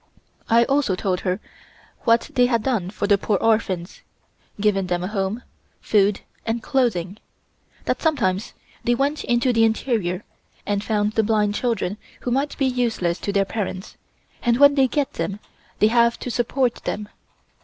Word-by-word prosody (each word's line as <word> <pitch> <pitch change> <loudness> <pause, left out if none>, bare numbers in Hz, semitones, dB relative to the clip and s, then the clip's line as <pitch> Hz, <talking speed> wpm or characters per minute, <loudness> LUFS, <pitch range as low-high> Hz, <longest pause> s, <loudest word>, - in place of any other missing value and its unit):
I 230 +1 +6
also 270 -6 +1
told 185 -1 -1
her 185 +1 -1 0.7
what 230 0 +3
they 245 -1 +4
had 235 -3 +1
done 220 -9 0
for 205 - -3
the 200 -1 +3
poor 205 0 +1
orphans 195 -5 0 0.6
given 200 -2 +1
them 175 0 -1
a - - -2
home, 200 +3 -2 0.4
food 205 -1 +2 0.2
and 225 0 -2
clothing; 210 -7 0 0.7
that - - -1
sometimes 215 - 0 0.3
they 240 - +2
went 285 +4 0
into 240 +1 +2
the 225 -1 +4
interior 220 -5 0 0.4
and 205 0 -1
found 210 -1 0
the 220 - +2
blind 210 -1 +1
children 215 -3 -1 0.2
who 245 - -3
might 275 +4 0
be 275 - +1
useless 235 -9 0
to 200 - -2
their 200 -1 +2
parents, 195 -2 -4 0.5
and 240 -2 +2
when 285 +1 +7
they 270 -2 +4
get 285 +1 -1
them 200 0 -3 0.4
they 215 - +4
have 235 0 +3
to 250 - -4
support 245 +1 0
them. 210 0 -3
220 Hz, 165 wpm, -22 LUFS, 195-245 Hz, 0.7 s, when